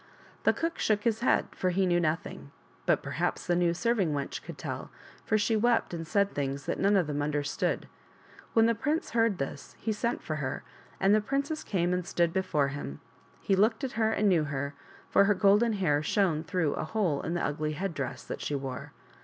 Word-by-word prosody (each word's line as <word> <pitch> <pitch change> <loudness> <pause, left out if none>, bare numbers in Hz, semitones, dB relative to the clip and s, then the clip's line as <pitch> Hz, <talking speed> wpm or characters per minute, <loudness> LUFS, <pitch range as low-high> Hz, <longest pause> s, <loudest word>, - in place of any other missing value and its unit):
The - - +7
cook 330 0 -2
shook 210 -1 +1
his 225 -2 +1
head, 240 - +3
for 185 - -1
he 190 +2 +2
knew 175 -1 +3
nothing, 155 - -2 0.4
but - - +3
perhaps - - -2
the 175 - +2
new 175 -1 +3
serving 195 -3 +1
wench 140 -1 -3
could - - -9
tell, - - -5 0.4
for 215 - +2
she 220 +2 +1
wept 230 -2 +2
and 165 -1 -4
said 200 +1 +2
things 140 -1 -2
that - - -2
none 200 +1 +4
of 185 -4 +3
them 145 -1 -2
understood. 145 -1 -1 0.7
When 225 -1 +5
the 230 - +4
prince 310 - -1
heard 225 -4 +2
this 135 +1 -5
he 220 - -2
sent 235 +3 -2
for 155 - -3
her, 130 -3 -3 0.4
and 195 +1 +4
the 215 - +4
princess 280 +7 -2
came 180 -2 0
and 180 0 0
stood 170 -1 +1
before 175 -7 +1
him. 135 - -6 0.4
He 195 - +2
looked 220 +6 +2
at 265 - -1
her 220 0 +1
and 215 -1 +2
knew 170 -6 +3
her, 140 0 -3 0.3
for 200 - +5
her 205 0 +3
golden 210 +4 +4
hair 155 -8 +1
shone 160 -1 +1
through 165 -2 0
a - - -3
hole 175 -6 0
in 170 - -3
the 175 - 0
ugly 150 +1 -2
head 190 +3 -3
dress 135 -4 -4
that - - -6
she 145 - -2
wore. 135 -2 -5
180 Hz, 210 wpm, -29 LUFS, 150-215 Hz, 0.7 s, The